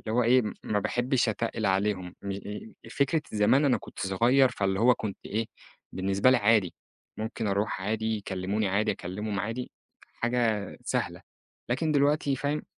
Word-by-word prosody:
اللي 110 - -5
هو 125 - +4
إيه 125 +2 +5 0.2
ما 105 - 0
باحبِّش 120 +4 +1
أتقِّل 110 0 -1
عليهم، 95 -2 0
م 100 - -4
إيه 105 +3 -7 0.2
فكرة 145 +5 +1
زمان 110 +7 +4
أنا 135 -3 +4
كنت - - -13
صغير 120 +8 +4
فاللي 95 -2 -1
هو 125 +2 +6
كنت 105 -4 -5
إيه، 110 +2 -2 0.5
بالنسبة 100 +6 +2
لي 130 - +5
عادي، 105 -5 +3 0.4
ممكن 110 +1 -3
أروح 100 0 0
عادي، 110 +2 -1
يكلِّموني 100 +1 -2
عادي، 105 +3 +1
أكلِّمهم 100 +3 -4
عادي، 115 +5 -4 0.4
حاجة 115 -4 0
سهلة - - -2 0.5
لكن 155 +6 +1
دلوقتي 145 -1 +2
فاهم 145 +3 -1
110 Hz, 155 wpm, -28 LUFS, 100-125 Hz, 0.5 s, هو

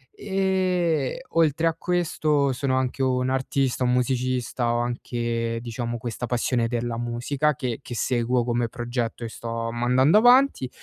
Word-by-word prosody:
e, 185 - 0
oltre 165 0 +2
a 165 - +1
questo, 155 -5 +1
sono 130 0 0
anche 130 +1 -1
un 130 -1 +1
artista, 130 -1 0
un 125 0 +2
musicista. 125 -1 0
Ho 120 - +1
anche, 120 -1 -2
diciamo, 120 0 -4
questa 120 +1 -5
passione 120 0 0
della 120 0 -2
musica 130 +5 -1
che 125 -4 -3
che 120 - -7
seguo 120 0 +1
come 120 -1 -1
progetto 120 -1 -3
e - - -3
sto 115 0 -4
mandando 125 - +4
avanti 245 - +4
125 Hz, 145 wpm, -24 LUFS, 120-145 Hz, -, mandando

